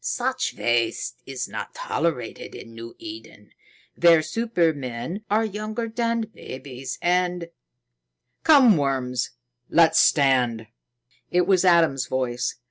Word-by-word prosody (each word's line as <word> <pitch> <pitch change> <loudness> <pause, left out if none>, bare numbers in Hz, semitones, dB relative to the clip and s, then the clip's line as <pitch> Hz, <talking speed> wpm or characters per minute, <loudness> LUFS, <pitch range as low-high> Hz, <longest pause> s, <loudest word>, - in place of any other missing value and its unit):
Such 255 +1 -1
waste 120 -1 -1
is 135 -2 -4
not - - -7
tolerated 170 - -3
in 115 - -11
New 115 +1 -10
Eden, 330 0 -11 0.4
where 165 -2 +5
supermen 165 - -2
are 220 +2 +2
younger 215 +2 -4
than 230 0 -1
babes 135 - -8
and 180 -1 0 0.5
" - - -55
"Come, 265 - +6
worms; 130 -3 -1 0.4
let's 165 -1 +5
land." 125 -5 +2 0.6
It 180 0 +2
was 190 -2 +3
Adam's 165 -7 +3
voice. 125 -1 -2
165 Hz, 115 wpm, -24 LUFS, -, 0.6 s, Come